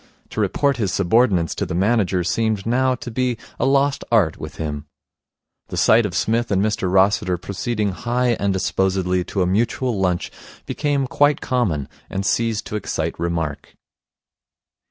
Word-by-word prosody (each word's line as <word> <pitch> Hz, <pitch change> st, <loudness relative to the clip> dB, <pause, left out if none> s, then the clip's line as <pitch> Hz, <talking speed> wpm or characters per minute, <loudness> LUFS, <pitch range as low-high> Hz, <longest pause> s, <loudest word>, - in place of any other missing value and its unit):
To -, -, -2 dB
report 140 Hz, -2 st, +1 dB
his 105 Hz, -6 st, 0 dB
subordinates 95 Hz, -3 st, +2 dB
to -, -, -3 dB
the -, -, -3 dB
manager 95 Hz, -2 st, +2 dB
seemed 110 Hz, +3 st, 0 dB
now 130 Hz, +2 st, +2 dB
to 120 Hz, 0 st, -8 dB
be 125 Hz, 0 st, 0 dB, 0.2 s
a -, -, +2 dB
lost 140 Hz, +1 st, +2 dB
art 105 Hz, -9 st, +3 dB
with -, -, -8 dB
him. 75 Hz, -2 st, -5 dB, 0.8 s
The -, -, -6 dB
sight 110 Hz, 0 st, +5 dB
of 90 Hz, -, -7 dB
Psmith 115 Hz, +4 st, 0 dB
and 100 Hz, -, +2 dB
Mr 105 Hz, -2 st, 0 dB
Rossiter 95 Hz, -1 st, +3 dB
proceeding 100 Hz, +3 st, -2 dB
high 120 Hz, +5 st, -1 dB
and 100 Hz, 0 st, +1 dB
disposedly 95 Hz, -1 st, 0 dB
to 95 Hz, 0 st, -1 dB
a -, -, +1 dB
mutual 115 Hz, +4 st, 0 dB
lunch 90 Hz, -2 st, 0 dB, 0.3 s
became 145 Hz, -2 st, 0 dB
quite 145 Hz, +2 st, +2 dB
common, 95 Hz, -, -1 dB, 0.2 s
and 95 Hz, +1 st, -3 dB
ceased 115 Hz, 0 st, 0 dB
to -, -, -5 dB
excite 80 Hz, -5 st, -3 dB
remark. 85 Hz, -4 st, -3 dB
105 Hz, 155 wpm, -21 LUFS, 90-120 Hz, 0.8 s, sight